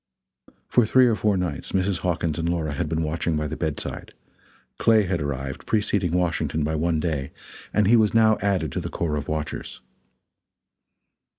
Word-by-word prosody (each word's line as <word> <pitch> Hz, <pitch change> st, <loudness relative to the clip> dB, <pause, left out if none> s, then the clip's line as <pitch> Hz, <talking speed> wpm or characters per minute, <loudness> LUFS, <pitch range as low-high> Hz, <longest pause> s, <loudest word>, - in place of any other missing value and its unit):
For 120 Hz, -, +4 dB
three 130 Hz, +3 st, +5 dB
or 115 Hz, -3 st, +3 dB
four 105 Hz, -1 st, +1 dB
nights 85 Hz, -6 st, -3 dB
Mrs. 95 Hz, -1 st, +1 dB
Hawkins 85 Hz, -3 st, -1 dB
and 85 Hz, +1 st, -1 dB
Laura 80 Hz, -4 st, -1 dB
had 75 Hz, +2 st, -2 dB
been 80 Hz, 0 st, 0 dB
watching 80 Hz, +1 st, -1 dB
by 75 Hz, -, -1 dB
the 75 Hz, +1 st, -4 dB
bedside; 80 Hz, -3 st, -4 dB, 0.6 s
Clay 110 Hz, -2 st, +5 dB
had 90 Hz, -4 st, -1 dB
arrived, 65 Hz, -2 st, -4 dB
preceding 100 Hz, -5 st, +1 dB
Washington 85 Hz, -3 st, 0 dB
by 80 Hz, +2 st, -1 dB
one 80 Hz, +1 st, 0 dB
day, 75 Hz, -4 st, -2 dB, 0.4 s
and 105 Hz, -, +2 dB
he 110 Hz, +5 st, +5 dB
was 110 Hz, -2 st, +4 dB
now 110 Hz, -1 st, +5 dB
added 95 Hz, -7 st, 0 dB
to -, -, -2 dB
the -, -, -5 dB
corps 80 Hz, -3 st, -2 dB
of 75 Hz, -, -4 dB
watchers. 75 Hz, -1 st, -4 dB
85 Hz, 175 wpm, -24 LUFS, 75-100 Hz, 0.6 s, three